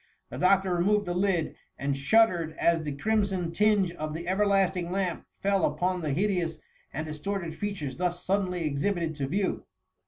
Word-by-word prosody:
The - - -6
doctor 190 0 +3
removed 205 +4 +2
the 175 - -2
lid, 180 -3 0 0.2
and 140 0 -1
shuddered 170 +1 +3
as 170 -1 +2
the 150 -2 -3
crimson 195 +2 0
tinge 205 -1 +3
of 155 -2 -5
the 170 +1 -6
everlasting 190 -2 +2
lamp 185 -2 -2
fell 195 -1 +1
upon 180 0 0
the 155 -3 -2
hideous 175 -1 0 0.3
and 155 +3 -4
distorted 165 +3 -4
features 160 -8 -4
thus 175 0 -2
suddenly 185 -3 0
exhibited 160 +3 -1
to 135 -2 -2
view. 190 +6 -1
180 Hz, 160 wpm, -28 LUFS, 160-195 Hz, 0.3 s, doctor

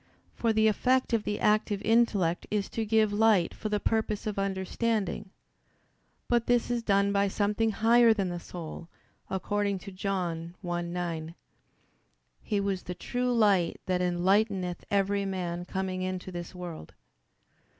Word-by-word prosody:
For 230 - +1
the 220 0 +3
effect 255 +4 +2
of 225 -2 +1
the 205 - -2
active 210 -1 +2
intellect 210 -7 +2
is 205 -2 -1
to 225 - -2
give 215 -1 +3
light 210 -4 +3
for 215 - -5
the 210 0 0
purpose 220 0 -1
of 210 -2 -2
understanding. 195 +1 -1 1.0
But 240 -1 +1
this 245 0 +2
is 240 -1 0
done 200 -2 +2
by 200 0 +3
something 210 +3 +1
higher 230 +2 +5
than 200 -4 +1
the 175 0 -4
soul: 170 -1 -8 0.4
according 200 +1 -1
to 195 +2 -9
John 180 -3 -3
1:9, 170 -2 -3 1.1
"He 205 - -1
was 195 -2 -1
the 180 - -6
true 250 +7 -2
light 205 -7 +3
that 180 -1 0
enlighteneth 180 +1 +1
every 200 0 +1
man 175 -2 -3
coming 190 0 -3
into 185 0 -4
this 175 0 -7
world." 175 - -8
200 Hz, 145 wpm, -29 LUFS, 180-220 Hz, 1.1 s, higher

